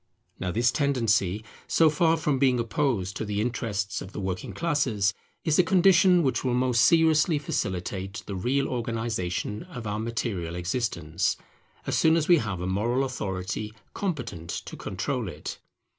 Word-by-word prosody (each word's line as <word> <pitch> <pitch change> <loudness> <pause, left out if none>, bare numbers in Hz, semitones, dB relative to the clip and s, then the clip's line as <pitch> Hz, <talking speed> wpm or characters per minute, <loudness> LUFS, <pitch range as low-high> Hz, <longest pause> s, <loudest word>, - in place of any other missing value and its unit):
Now 90 - -2
this 115 +6 +2
tendency, 110 -8 +1 0.2
so 165 - +4
far 165 +1 +3
from 150 -3 0
being 130 -2 +3
opposed 115 -5 0
to - - -3
the 105 -1 -2
interests 105 -3 -2
of 95 - -9
the - - -5
working 95 -2 -3
classes, 130 - +1 0.3
is 160 -1 +2
a - - +7
condition 180 0 +5
which 130 - 0
will 125 -2 +1
most 125 -2 +2
seriously 160 -1 +4
facilitate 95 -6 -3
the 100 - -5
real 135 +9 0
organization 115 -5 -2
of 140 -11 -8
our 105 0 -2
material 110 -7 -3
existence, 90 -3 -1 0.5
as - - -1
soon 160 +1 +5
as 155 - 0
we 175 - +7
have 100 - -3
a - - -2
moral 115 +8 +1
authority 105 -3 -4 0.2
competent 125 - -4
to - - -5
control - - -3
it. - - -7
115 Hz, 160 wpm, -27 LUFS, 100-145 Hz, 0.5 s, a